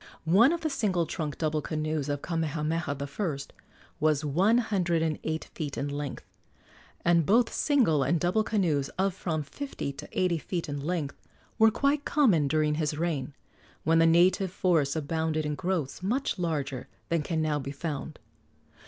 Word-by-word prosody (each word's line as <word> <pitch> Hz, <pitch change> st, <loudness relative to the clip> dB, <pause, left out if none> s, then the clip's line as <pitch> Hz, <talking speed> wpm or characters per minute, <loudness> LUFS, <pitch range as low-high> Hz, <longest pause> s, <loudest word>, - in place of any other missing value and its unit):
One 205 Hz, -, +6 dB
of 340 Hz, 0 st, -1 dB
the 315 Hz, -, 0 dB
single 195 Hz, -10 st, +1 dB
trunk 155 Hz, -3 st, -4 dB
double 155 Hz, -1 st, 0 dB
canoes 155 Hz, -1 st, -2 dB
of 145 Hz, -1 st, -2 dB
Kamehameha 160 Hz, -1 st, -1 dB
I. 140 Hz, +3 st, -3 dB, 0.6 s
was 150 Hz, -1 st, +2 dB
one 190 Hz, +11 st, +3 dB
hundred 180 Hz, -8 st, +1 dB
and 155 Hz, -2 st, -1 dB
eight 160 Hz, 0 st, -2 dB
feet 145 Hz, -3 st, -4 dB
in 145 Hz, -, -2 dB
length, 145 Hz, -1 st, -5 dB, 0.8 s
and 170 Hz, -1 st, +4 dB
both 230 Hz, +9 st, +3 dB
single 240 Hz, -, +3 dB
and 160 Hz, +5 st, +2 dB
double 180 Hz, +6 st, +2 dB
canoes 170 Hz, -11 st, 0 dB
of 190 Hz, 0 st, +1 dB
from 160 Hz, -4 st, -2 dB
fifty 210 Hz, -, -5 dB
to -, -, -10 dB
eighty 180 Hz, -3 st, +2 dB
feet 170 Hz, +2 st, -4 dB
in 145 Hz, -1 st, -4 dB
length 150 Hz, -1 st, -3 dB, 0.4 s
were 220 Hz, 0 st, +7 dB
quite 280 Hz, +5 st, +1 dB
common 205 Hz, -, +3 dB
during 155 Hz, +1 st, +2 dB
his 150 Hz, -1 st, -1 dB
reign, 150 Hz, -5 st, -2 dB, 0.5 s
when 165 Hz, +1 st, +4 dB
the 165 Hz, -, +6 dB
native 180 Hz, +3 st, +4 dB
forests 165 Hz, -7 st, +1 dB
abounded 160 Hz, 0 st, -1 dB
in 150 Hz, -, -1 dB
growths 170 Hz, -3 st, -2 dB
much 235 Hz, +4 st, -1 dB
larger 145 Hz, -6 st, -2 dB, 0.2 s
than 170 Hz, -1 st, +1 dB
can 160 Hz, +2 st, -2 dB
now 155 Hz, -2 st, +1 dB
be 135 Hz, 0 st, -5 dB
found. 145 Hz, +1 st, -5 dB
160 Hz, 165 wpm, -28 LUFS, 150-185 Hz, 0.8 s, were